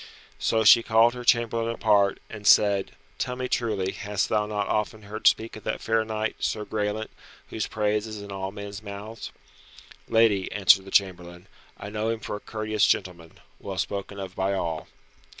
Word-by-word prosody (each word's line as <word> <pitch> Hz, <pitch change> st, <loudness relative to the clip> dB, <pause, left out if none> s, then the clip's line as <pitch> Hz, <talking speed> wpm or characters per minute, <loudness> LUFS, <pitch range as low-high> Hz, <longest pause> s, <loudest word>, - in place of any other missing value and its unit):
So 110 Hz, -1 st, +1 dB
she 115 Hz, +2 st, +8 dB
called 115 Hz, +1 st, +4 dB
her 125 Hz, -1 st, -7 dB
chamberlain 115 Hz, -1 st, +1 dB
apart, 100 Hz, -3 st, +3 dB
and 105 Hz, -2 st, -7 dB
said, 100 Hz, -2 st, +4 dB, 0.3 s
"Tell 125 Hz, -, -2 dB
me 130 Hz, 0 st, -3 dB
truly, 105 Hz, -7 st, -1 dB
hast 100 Hz, 0 st, -2 dB
thou 105 Hz, -1 st, +1 dB
not 105 Hz, -1 st, -2 dB
often 105 Hz, 0 st, -2 dB
heard 105 Hz, +2 st, -1 dB
speak 115 Hz, +1 st, +2 dB
of 110 Hz, -, -10 dB
that -, -, -2 dB
fair 110 Hz, 0 st, +1 dB
knight, 110 Hz, 0 st, -3 dB
Sir 105 Hz, -1 st, -2 dB
Graelent, 105 Hz, +1 st, -3 dB, 0.4 s
whose 110 Hz, -, -2 dB
praise 105 Hz, 0 st, -1 dB
is 110 Hz, -1 st, -7 dB
in 100 Hz, 0 st, -9 dB
all 95 Hz, 0 st, -4 dB
men's 100 Hz, 0 st, -8 dB
mouths?" 105 Hz, +2 st, -8 dB, 0.8 s
"Lady," 110 Hz, -4 st, +3 dB
answered 95 Hz, -1 st, +5 dB
the -, -, -10 dB
chamberlain, 90 Hz, -3 st, 0 dB, 0.3 s
"I 100 Hz, -, -8 dB
know 110 Hz, +1 st, -2 dB
him 115 Hz, -1 st, -2 dB
for 105 Hz, -, -5 dB
a -, -, -6 dB
courteous 110 Hz, 0 st, 0 dB
gentleman, 85 Hz, -3 st, -1 dB, 0.3 s
well -, -, -6 dB
spoken 100 Hz, 0 st, -3 dB
of 95 Hz, -1 st, -7 dB
by 95 Hz, +1 st, 0 dB
all." 80 Hz, -4 st, -3 dB
105 Hz, 180 wpm, -26 LUFS, 100-110 Hz, 0.8 s, she